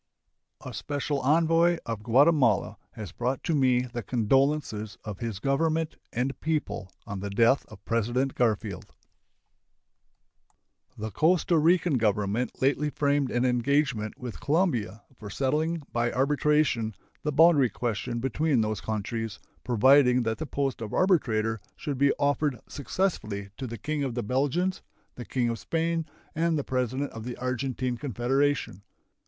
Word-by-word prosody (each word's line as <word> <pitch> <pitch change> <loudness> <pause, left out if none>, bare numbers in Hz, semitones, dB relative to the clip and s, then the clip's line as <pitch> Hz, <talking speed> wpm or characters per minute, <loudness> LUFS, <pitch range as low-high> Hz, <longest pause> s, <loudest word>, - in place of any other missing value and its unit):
A - - -6
special 145 0 -2
envoy 165 +4 +3
of 115 -2 -4
Guatemala 125 -1 +3 0.2
has 105 -6 -7
brought 125 +6 -2
to 165 - 0
me 130 -4 +3
the 120 -1 -5
condolences 120 -1 0
of 105 -3 -6
his 115 -4 -4
Government 155 +6 0 0.2
and 130 +3 -2
people 150 -11 -2
on 100 -1 -5
the 100 +1 -4
death 115 +7 +3
of 110 -3 -15
President 120 +4 0
Garfield. 105 -5 -1 2.0
The 110 0 -5
Costa 170 - +2
Rican 165 -3 +3
Government 105 +3 0
lately 145 +2 +2
framed 145 -2 +1
an 120 +1 0
engagement 125 -3 +1
with 125 -3 -7
Colombia 125 - 0 0.2
for 105 - -8
settling 155 +7 -1
by 120 0 0
arbitration 140 -5 +1 0.3
the 150 - -1
boundary 150 -4 +5
question 120 +2 -3
between 135 +1 +1
those 110 -2 -2
countries, 110 0 -3 0.3
providing 125 +1 +5
that 115 -1 -2
the 160 - -4
post 135 -4 -2
of 110 -2 -5
arbitrator 115 - +2
should 145 -4 -4
be 140 0 +5
offered 145 -2 0
successively 110 - -2
to 130 - -5
the 115 0 -6
King 150 +4 -2
of 130 -4 -3
the 120 - -2
Belgians, 145 - 0 0.3
the 120 - -8
King 125 -2 0
of 115 -1 -3
Spain, 165 +5 -1 0.3
and 165 0 +1
the 145 - -1
President 130 +2 -2
of 115 - -8
the 125 +1 -6
Argentine 130 0 -2
Confederation. 135 -3 0
130 Hz, 140 wpm, -27 LUFS, 115-150 Hz, 2.0 s, boundary